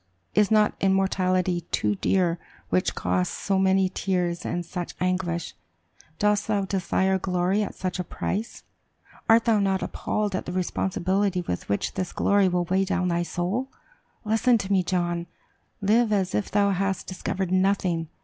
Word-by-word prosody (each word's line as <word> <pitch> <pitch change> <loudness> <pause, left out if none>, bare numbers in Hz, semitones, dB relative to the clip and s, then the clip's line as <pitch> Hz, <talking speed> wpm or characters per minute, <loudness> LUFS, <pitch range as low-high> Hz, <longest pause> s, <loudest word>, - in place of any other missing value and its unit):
Is 210 -1 +3
not 215 -1 +4
immortality 185 -2 +1
too 105 -1 +1
dear 175 - +1 0.3
which 185 - +1
costs 90 0 -1
so 195 -1 0
many 190 0 +3
tears 180 -2 -1
and 175 0 -2
such 175 +1 -5
anguish? 180 -2 -1 0.6
Dost 210 +1 +1
thou 205 -2 +1
desire 190 0 +1
glory 185 +2 +1
at 205 - -3
such 185 0 -3
a - - 0
price? 210 +5 -4 0.7
Art 225 +1 +6
thou 225 -3 +3
not 195 -1 +1
appalled 210 -2 -2
at - - -4
the - - -3
responsibility 185 +1 0
with 90 - -4
which 100 - -1
this 185 -2 -3
glory 200 -1 +3
will 180 -1 0
weigh 190 +2 +1
down 180 -1 0
thy 170 0 +1
soul? 185 +10 -2 0.6
Listen 225 +3 +3
to 200 -2 -4
me, 190 - +4
John: 175 -1 -1 0.5
live 215 +3 +3
as 190 -3 +1
if 205 - -1
thou 200 -1 +2
hadst 195 0 -1
discovered 185 0 -3
nothing. 185 -3 +1
190 Hz, 160 wpm, -25 LUFS, 180-200 Hz, 0.7 s, Art